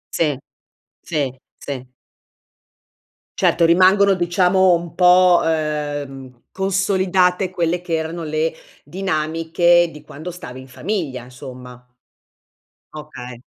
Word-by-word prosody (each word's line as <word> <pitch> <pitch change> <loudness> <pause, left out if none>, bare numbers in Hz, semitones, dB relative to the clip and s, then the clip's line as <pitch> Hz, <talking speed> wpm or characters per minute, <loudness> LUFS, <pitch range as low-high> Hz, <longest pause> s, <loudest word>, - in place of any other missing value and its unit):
Sì, 150 -5 +1 0.6
sì, 145 -5 -2 0.3
sì. 135 -3 -6 1.5
Certo, 170 - +3
rimangono, 190 +3 +5
diciamo, 180 +1 +3
un 170 -1 -6
po', 180 0 +5
uhm, 145 -5 -3
consolidate 190 -1 +1
quelle 175 -1 -1
che 170 -2 -2
erano 160 +1 -4
le 155 +1 -1 0.3
dinamiche 165 +1 +1
di 150 - -13
quando 155 +5 -9
stavi 130 -8 -9
in 130 - -12
famiglia, 145 - -4
insomma. 125 -1 -11 1.1
Okay. 125 -5 -9
165 Hz, 95 wpm, -20 LUFS, 145-180 Hz, 1.5 s, rimangono